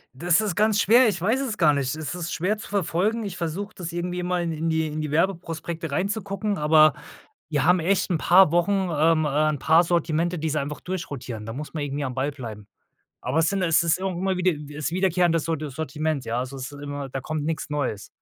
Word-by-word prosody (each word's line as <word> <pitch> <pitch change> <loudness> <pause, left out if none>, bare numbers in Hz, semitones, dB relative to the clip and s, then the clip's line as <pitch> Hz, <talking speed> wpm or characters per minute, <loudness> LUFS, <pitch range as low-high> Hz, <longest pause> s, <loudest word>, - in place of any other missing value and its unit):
Das 175 +7 +2
ist 205 -5 -2
ganz 210 -1 +3
schwer 240 +3 +6
ich 190 -5 -1
weiß 225 +8 +2
es 235 -6 -3
gar 155 -4 +5
nicht. 140 0 -1
Es 155 +1 -5
ist 175 -1 -4
schwer 195 +6 0
zu - - -9
verfolgen. 200 +4 0
Ich 195 -3 -5
versuche 180 +5 -4
das 175 -2 -6
irgendwie 175 +1 -3
immer 180 0 -1
in 170 -1 -2
in 160 +1 -2
die 160 0 +1
in 155 0 -4
die 150 -2 -4
Werbeprospekte 165 -1 -2
reinzugucken, 200 +4 -2
aber 155 0 +5 0.6
wir 145 -4 0
haben 180 +2 +5
echt 185 +3 +1
'n 175 - +1
paar 180 0 +6
Wochen 175 +3 +2 0.2
ähm, 155 +1 +3
äh, 150 +1 +2
'n 145 - -2
paar 160 +2 +5
Sortimente, 170 0 0
die 160 +1 -1
sie 150 - 0
einfach 145 +1 -5
durchrotieren. 130 -11 -5
Da 115 - -6
muss 150 +3 -7
man 155 -3 -3
irgendwie 145 0 -3
am 130 -2 -4
Ball 135 +2 -1
bleiben. 110 -7 -9 0.6
Aber 130 +6 -1
es 165 - +3
sind 195 -1 -1
es 165 -2 +3
ist 170 +1 +2
irgendwie 185 -2 -3
immer - - -2
mal - - -1
wieder 150 -5 -1
ist 150 -1 -2
wiederkehrendes 175 -3 +2
Sorti 155 -2 -2
Sortiment, 155 0 -3
ja? 115 +2 -2
Also 130 +2 -4
es 130 +1 -6
ist 145 - -10
immer, 145 -1 -5
da 135 0 -4
kommt 155 +1 -3
nix 160 +1 -3
Neues. 135 -9 -2
160 Hz, 235 wpm, -24 LUFS, 150-180 Hz, 0.6 s, schwer